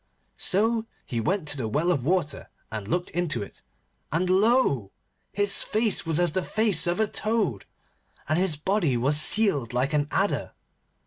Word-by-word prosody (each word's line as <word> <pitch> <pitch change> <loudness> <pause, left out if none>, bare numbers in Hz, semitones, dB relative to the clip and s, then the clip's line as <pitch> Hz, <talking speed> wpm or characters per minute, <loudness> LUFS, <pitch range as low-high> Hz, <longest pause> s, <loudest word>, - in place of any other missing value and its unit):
So 225 +3 +1 0.2
he 120 -4 -3
went 180 - -1
to 145 - +1
the 120 -4 -2
well 155 +11 +1
of 140 -8 0
water 165 -1 -1 0.2
and 110 -3 -5
looked 175 +9 -1
into 165 -10 -1
it, - - -13 0.5
and 180 +4 0
lo! 190 - +2 0.4
his 205 -1 +1
face 215 -5 0
was 165 0 +2
as 175 -2 +2
the 185 - 0
face 210 -3 +1
of 175 +4 0
a 220 - +3
toad, 210 - -2 0.6
and 155 +3 +1
his 185 -4 +1
body 165 - 0
was 145 +5 +3
sealed 155 - +2
like 130 +4 0
an 145 -1 +1
adder. 195 +4 -1
175 Hz, 170 wpm, -26 LUFS, 145-205 Hz, 0.6 s, a